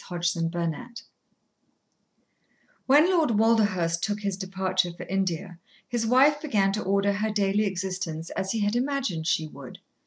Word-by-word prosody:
Chapter 170 -1 -1
Twelve 170 -2 -2 2.1
When 290 +5 +6
Lord 310 - +2
Walderhurst 205 -7 +2
took 210 +2 -2
his 200 -2 -2
departure 190 -1 -1
for 175 +1 -9
India, 180 -1 -3 0.3
his 230 -1 -1
wife 280 +5 +4
began 205 -10 +1
to 215 - -2
order 200 +1 +1
her 210 +2 -1
daily 205 0 +1
existence 185 -4 -4
as 190 0 -3
he 225 - -1
had 205 +2 0
imagined 245 - -1
she 160 - +1
would. 140 -4 -11
195 Hz, 145 wpm, -26 LUFS, 175-220 Hz, 2.1 s, When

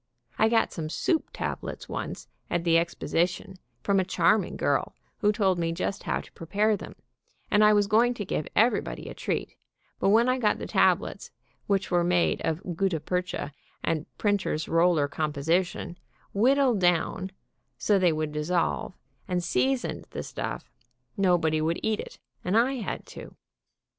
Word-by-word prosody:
I 220 - +5
got 225 -1 +2
some 155 -2 -4
soup 320 - 0
tablets - - -5
once - - -5 0.2
at 170 - 0
the 165 -1 +4
Exposition, 175 +3 -2 0.2
from 195 -1 +3
a - - +2
charming 180 +2 +2
girl, - - 0 0.2
who 210 -2 +3
told 195 -4 +1
me 165 -1 0
just 185 +4 -3
how - - -1
to - - -16
prepare 210 +6 +1
them, - - -9 0.6
and 210 - +5
I 210 0 +7
was 205 -1 +4
going 230 +4 +3
to 205 - -4
give 155 - -2
everybody 230 +4 +1
a - - -6
treat, - - -3 0.4
but - - +2
when 230 +4 +5
I 255 +1 +2
got 215 -4 +2
the - - -6
tablets, - - +1 0.4
which 195 -2 0
were 175 -1 +3
made 175 0 +2
of 170 +2 -2
gutta 185 -2 0
percha 180 -2 -3 0.3
and 155 -2 -1
printer's 200 -7 0
roller 165 -3 +3
composition, 160 +4 -1 0.3
whittled 255 +1 +3
down 175 +1 +1 0.5
so 205 -2 +2
they 180 -2 +4
would 155 -1 -2
dissolve, 170 +4 -1 0.3
and 180 -1 -1
seasoned 135 -5 0
the - - -5
stuff, - - -5 0.4
nobody 175 -5 +2
would 165 +2 0
eat 220 -1 0
it, - - -8 0.3
and 185 +5 +1
I 260 +3 +3
had 225 - -4
to. - - -10
180 Hz, 160 wpm, -27 LUFS, 165-210 Hz, 0.6 s, I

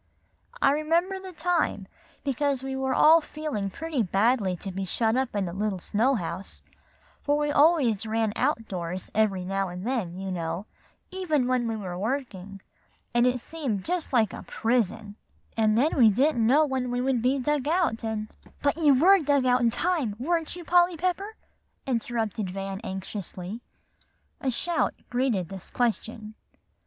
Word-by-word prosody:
I 275 - +6
remember 335 +6 +1
the 380 0 -9
time, 335 - 0 0.4
because 275 -1 0
we 270 0 -3
were 265 0 -1
all 320 +2 +7
feeling 300 -11 -4
pretty 315 - -2
badly 200 0 +2
to 195 +2 -7
be 195 +1 -4
shut 220 +4 +1
up 260 -3 -1
in 200 -2 0
the 170 - -5
little 205 0 -1
snow 230 +9 +1
house; 185 -1 -5 0.6
for 290 0 +1
we 295 0 0
always 285 - +3
ran 220 -1 0
out 225 -1 0
doors 180 0 -5
every 200 -4 +1
now 195 0 -1
and 180 +2 -7
then, 220 -9 -2
you 190 0 -4
know, 170 +2 -3 0.5
even 330 -8 0
when 250 -1 +1
we 225 - -1
were 185 -4 -5
working, 200 -5 -4 0.5
and 240 +1 +4
it 250 0 +1
seemed 250 -9 -4
just 355 -1 -2
like 225 -6 +2
a - - -7
prison, 225 -2 -1 0.4
and 220 -1 +3
then 285 +6 +2
we 235 -5 +7
didn't 240 +1 +2
know 295 +6 +5
when 260 -3 -2
we 245 0 -1
would 255 -1 +1
be 255 +3 +2
dug 285 +1 0
out, 325 -10 +1
and" 220 -1 -3 0.3
"But 285 +2 +2
you 285 -5 +5
were 385 +5 +7
dug 285 -4 +2
out 250 0 +4
some 235 -1 +3
time, 290 - 0
weren't 325 +6 -1
you, 350 -1 -9
Polly 350 0 +4
Pepper?" 370 +5 -2 0.5
interrupted 225 -5 -2
Van 195 +1 -5
anxiously. 190 +2 -6 0.8
A 265 - -1
shout 340 +7 0 0.2
greeted 245 -9 0
this 190 -2 -9
question. 225 -2 -2
240 Hz, 165 wpm, -26 LUFS, 205-290 Hz, 0.8 s, all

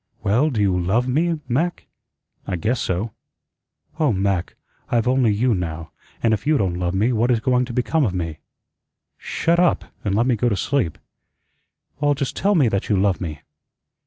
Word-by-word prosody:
"Well, 120 +10 +3
do 120 -7 -2
you 100 -3 +2
LOVE 105 +8 +1
me, 160 +5 +1
Mac?" 160 +8 -1 0.6
"I 95 - -1
guess 110 +8 -1
so." 95 +5 -2 0.9
"Oh, 150 -5 +3
Mac, 95 -3 -1 0.3
I've 120 0 +1
only 125 -3 +3
you 115 +4 +2
now, 85 -4 -4 0.3
and 115 -1 +3
if 110 +6 -2
you 155 -1 +4
don't 90 -5 -1
love 90 +1 -1
me, 110 +6 +2
what 115 +2 +1
is 120 -2 +3
going 125 +2 +2
to 125 - -7
become 125 +6 +1
of 105 -8 0
me?" 80 -3 -3 0.8
"Shut 170 +1 0
up, 180 -1 +2 0.2
an' 100 - -1
let 115 +4 +2
me 125 -2 +2
go 120 +3 +1
to 105 - -1
sleep." 125 - 0 1.0
"Well, 145 0 +2
just 140 -1 -3
tell 205 +1 +2
me 145 -8 +4
that 100 -2 -2
you 105 - +3
love 95 -1 +1
me." 75 -5 -5
115 Hz, 190 wpm, -22 LUFS, 95-130 Hz, 1.0 s, you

